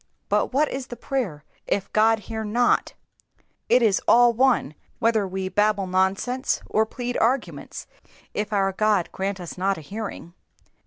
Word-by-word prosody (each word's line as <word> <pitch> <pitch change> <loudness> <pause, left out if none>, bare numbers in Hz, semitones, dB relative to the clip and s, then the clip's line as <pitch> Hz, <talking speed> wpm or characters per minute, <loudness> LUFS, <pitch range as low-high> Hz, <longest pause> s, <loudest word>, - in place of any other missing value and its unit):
But - - +1
what 290 +4 +2
is 265 -1 -5
prayer 240 - -4 0.2
if 195 - -2
God 220 0 +4
hear 220 0 -5
not? 235 +3 +1 0.7
It 250 - +5
is 210 -4 +3
all 240 0 +6
one 245 - +2 0.2
whether 225 -4 +2
we 190 0 -3
babble 205 0 +1
nonsense 190 +8 0
or 220 0 +1
plead 245 +1 -4
arguments 250 +3 -1 0.5
if 210 0 -3
our 195 -2 +2
God 205 -2 +1
grant 195 0 -3
us 175 0 -8
not 195 +1 +1
a - - -8
hearing. 200 -1 -7
215 Hz, 150 wpm, -24 LUFS, 195-240 Hz, 0.7 s, all